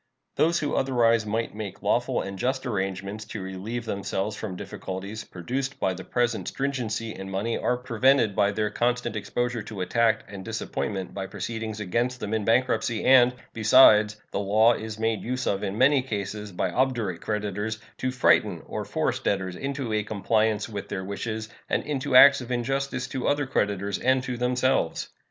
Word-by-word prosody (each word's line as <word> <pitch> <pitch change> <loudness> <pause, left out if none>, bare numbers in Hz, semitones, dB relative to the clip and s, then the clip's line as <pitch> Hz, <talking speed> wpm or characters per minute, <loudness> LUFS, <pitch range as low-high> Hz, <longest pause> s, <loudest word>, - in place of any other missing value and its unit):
Those 170 +2 +3
who 145 -3 -1
otherwise 115 -4 +2
might 115 +1 -2
make 105 -3 -7
lawful - - +1
and 100 -1 -7
just 130 +4 -1
arrangements 100 -1 -3
to 105 -1 -6
relieve 100 +6 -5
themselves 100 0 -2
from 100 -3 -5
difficulties 95 +4 -6
produced 130 +10 -4
by 95 - +1
the 95 - -8
present 120 -2 -1
stringency 115 -5 -2
in 95 0 -7
money 100 +4 -1
are 125 - 0
prevented 125 -2 +2
by 100 - +3
their 105 0 -1
constant 120 -1 0
exposure 120 +2 -2
to 105 -2 -7
attack 110 +3 +2
and 100 -1 -8
disappointment 100 -3 -4
by 95 -1 -4
proceedings 110 +2 -5
against 120 +5 -1
them 105 -2 -4
in 110 -1 0
bankruptcy, 115 -1 +1
and, 125 -1 +6 0.2
besides, 110 -2 +6
the - - -1
law 110 +4 +4
is 110 -1 -6
made 110 -1 0
use 125 +2 -3
of 100 0 0
in 100 0 -3
many 135 +3 +5
cases 105 -3 -4
by 90 0 -1
obdurate 115 -6 0
creditors 105 +1 -2 0.2
to 130 - 0
frighten 130 0 +2
or - - -4
force - - -1
debtors 95 -2 -1
into 135 -1 -3
a 105 - +2
compliance 110 +1 0
with 105 -3 -6
their 95 -1 -3
wishes 110 +2 -4 0.2
and - - +1
into 140 -2 -2
acts 140 +1 +9
of 125 0 -7
injustice 130 +2 -1
to 130 -2 -3
other 145 0 +1
creditors 100 -6 -1
and 130 +1 +2
to 125 -1 -3
themselves. 125 -6 0
110 Hz, 175 wpm, -26 LUFS, 100-125 Hz, 0.2 s, acts